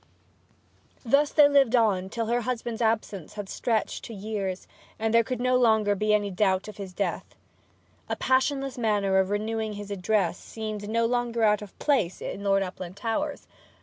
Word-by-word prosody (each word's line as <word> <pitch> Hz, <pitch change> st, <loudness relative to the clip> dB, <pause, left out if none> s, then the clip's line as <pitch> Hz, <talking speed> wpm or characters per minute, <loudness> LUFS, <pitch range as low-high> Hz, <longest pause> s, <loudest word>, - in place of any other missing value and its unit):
Thus 280 Hz, +5 st, +3 dB
they 295 Hz, -2 st, +7 dB
lived 275 Hz, -4 st, +4 dB
on 200 Hz, -5 st, +2 dB
till 230 Hz, +2 st, -2 dB
her 240 Hz, +2 st, 0 dB
husband's 235 Hz, -1 st, -3 dB
absence 215 Hz, -6 st, -1 dB
had 205 Hz, -2 st, -6 dB
stretched 225 Hz, +2 st, -1 dB
to 230 Hz, -, -8 dB
years, 195 Hz, -2 st, -4 dB, 0.3 s
and 220 Hz, 0 st, -1 dB
there 230 Hz, 0 st, +6 dB
could 255 Hz, +2 st, -3 dB
be 245 Hz, -, -4 dB
no 255 Hz, 0 st, +3 dB
longer 220 Hz, -4 st, +3 dB
any 210 Hz, -1 st, +2 dB
doubt 190 Hz, 0 st, +1 dB
of 215 Hz, -1 st, -9 dB
his 195 Hz, -2 st, -7 dB
death. 195 Hz, +2 st, -3 dB, 0.7 s
A -, -, 0 dB
passionless 265 Hz, 0 st, 0 dB
manner 205 Hz, -4 st, +2 dB
of 190 Hz, 0 st, +1 dB
renewing 215 Hz, +1 st, -2 dB
his 205 Hz, 0 st, -7 dB
addresses 195 Hz, -2 st, 0 dB
seemed 215 Hz, -2 st, -6 dB
no 230 Hz, +1 st, +1 dB
longer 240 Hz, -1 st, 0 dB
out 210 Hz, -1 st, +4 dB
of 205 Hz, -2 st, -11 dB
place 220 Hz, -, +1 dB
in 200 Hz, -, -6 dB
Lord 195 Hz, -1 st, +3 dB
Uplandtowers. 205 Hz, -, -4 dB
215 Hz, 170 wpm, -27 LUFS, 200-235 Hz, 0.7 s, they